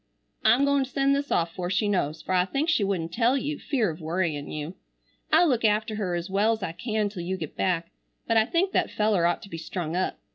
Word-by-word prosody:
I'm 240 +6 +5
goin 280 -1 +3
to 265 - -7
send 275 0 +2
this 280 +1 -2
off 165 -1 +1
fore 175 -1 -4
she 200 +3 +1
knows, 160 -6 -1
fer - - -2
I 180 -1 +3
think 275 - -1
she 275 -10 +3
wouldn't 175 -4 -2
tell 240 +5 +3
you 290 +2 -3
fear 230 - 0
of 160 +2 -10
worryin 160 -3 -2
you. 155 +3 -5 0.6
I'll 350 - +6
look 245 -6 +1
after 215 +1 +2
her 185 -5 -1
es 170 +1 -3
well's 210 +2 +1
I 165 - -2
can 215 +3 -1
till 200 -3 -6
you 185 +2 -3
get 155 -5 -6
back, 170 -2 -1 0.3
but 230 - +1
I 220 -1 +5
think 370 +6 +1
that - - +1
feller 210 -5 +2
ought 175 - -1
to 200 - -11
be 165 - -5
strung 165 0 -4
up. 185 - -1
200 Hz, 245 wpm, -26 LUFS, 170-235 Hz, 0.6 s, I'll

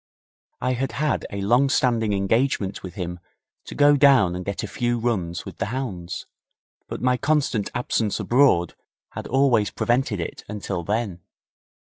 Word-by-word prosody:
I 130 - +1
had 130 +2 -2
had 150 +1 -1
a 100 -1 -5
long 120 +7 +3
standing 120 -5 +2
engagement 100 +1 0
with 90 -1 -9
him 90 -3 -5 0.5
to - - -8
go 145 0 +5
down 135 -11 +5
and 90 - -4
get 100 +1 -4
a - - -3
few 120 0 -1
runs 95 -8 -2
with - - -9
the - - -2
hounds, 100 -8 -5 0.6
but - - -6
my 125 0 +3
constant 140 -6 0
absence 115 -3 -1
abroad 120 - +3 0.4
had - - -6
always 125 -5 +3
prevented 120 -4 0
it 85 - -5
until 100 -3 -4
then. 105 -1 -2
115 Hz, 155 wpm, -23 LUFS, 95-130 Hz, 0.6 s, go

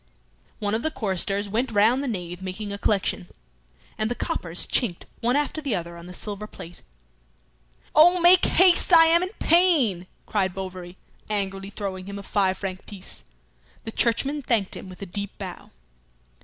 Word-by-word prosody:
One 205 -1 -2
of 220 - 0
the 315 - 0
choristers 200 - -1
went 230 +5 -1
round 225 +5 +3
the - - -2
nave 180 -5 -4
making 200 +2 -5
a 200 - -6
collection, 195 -3 0 0.7
and 215 - 0
the 245 - -2
coppers 170 -5 -2
chinked 205 -9 -1
one 245 +2 +1
after 295 +2 -1
the 275 -7 -1
other 170 -1 -5
on 170 +1 -11
the 180 - -9
silver 210 +1 -5
plate. 175 -4 -11 1.1
"Oh, 350 +4 +6
make 350 +1 +7
haste! 365 0 +4
I 330 -1 +8
am 335 +1 +4
in 365 - -2
pain!" 295 - +3 0.2
cried 190 -4 -1
Bovary, 185 -1 -7 0.3
angrily 195 -2 -3
throwing 195 -2 -6
him 200 0 -6
a 200 - -8
five 190 -2 +1
franc 190 -2 -6
piece. 195 -3 -9 0.6
The 225 - -5
churchman 270 +7 0
thanked 225 -7 0
him 190 - -9
with 185 +2 -9
a - - -4
deep 200 +2 -6
bow. 190 -3 -8
205 Hz, 170 wpm, -24 LUFS, 185-250 Hz, 1.1 s, I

